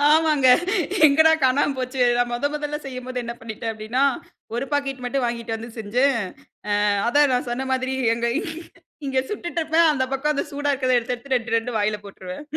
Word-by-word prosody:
ஆமாங்க. 305 -4 +4 0.6
எங்கடா 315 +2 +5
காணாம 275 +2 +2
போச்சே! 255 0 -1
நான் 245 0 +1
முத 240 +4 0
முதல்ல 295 0 -3
செய்யும்போது 255 -1 -5
என்ன 235 - -4
பண்ணிட்டேன் 225 0 -5
அப்பிடினா, 220 +4 -2 0.5
ஒரு 240 +3 -1
பாக்கெட் 275 -2 -1
மட்டும் 250 +1 -1
வாங்கிட்டு 235 -1 -3
வந்து 225 +1 -8
செஞ்சேன். 250 +6 +1 0.7
அ 210 - +3 0.2
அதான் 285 +3 +4
நான் 250 0 0
சொன்ன 260 +2 -2
மாதிரி 260 0 -1 0.2
எங்க 235 +1 -2 0.8
இங்க 265 -1 0
சுட்டுட்டுருப்பேன், 335 -4 +1
அந்த 260 -3 0
பக்கம் 295 +3 +1
அந்த - - -1
சூடா 290 0 -1
இருக்கிறத 255 -2 +2
எடுத்து, 245 +1 -2
எடுத்து 260 +2 -3
2 230 -1 -2
2 230 +2 -2
வாயில 210 0 0
போட்டுருவேன் 185 +1 -8
255 Hz, 170 wpm, -23 LUFS, 235-285 Hz, 0.8 s, எங்கடா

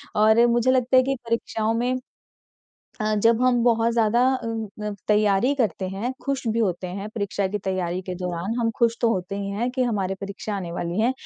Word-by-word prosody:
और 220 +2 +5
मुझे 240 +2 +3
लगता 255 0 +3
है 255 - +6
कि 270 +1 0
परीक्षाओं 225 -1 -1
में 245 +2 0 1.1
अ, 215 0 +1
जब 225 +2 +3
हम 250 -2 +3
बहुत 230 -1 +3
ज़्यादा 230 +1 +3
अ 255 -3 -4 0.4
अ, 210 - -2 0.2
तैयारी 210 +4 +3
करते 210 - -1
हैं, 200 +7 -3
खुश 275 -3 -2
भी 225 +1 0
होते 185 -5 0
हैं 195 +3 -5
परीक्षा 200 -2 -1
की 210 +2 -2
तैयारी 185 -2 -2
के 185 0 -5
दौरान 180 +3 -3
हम 230 -1 +1
खुश 235 -1 +3
तो 235 - +3
होते 185 0 -3
ही 200 0 -3
हैं 230 +5 -1
कि 255 +1 -1
हमारी 200 -6 -1
परीक्षा 200 +1 -5
आने 175 -3 -5
वाली 170 +2 -3
हैं, 240 +4 +3
215 Hz, 205 wpm, -24 LUFS, 195-235 Hz, 1.1 s, है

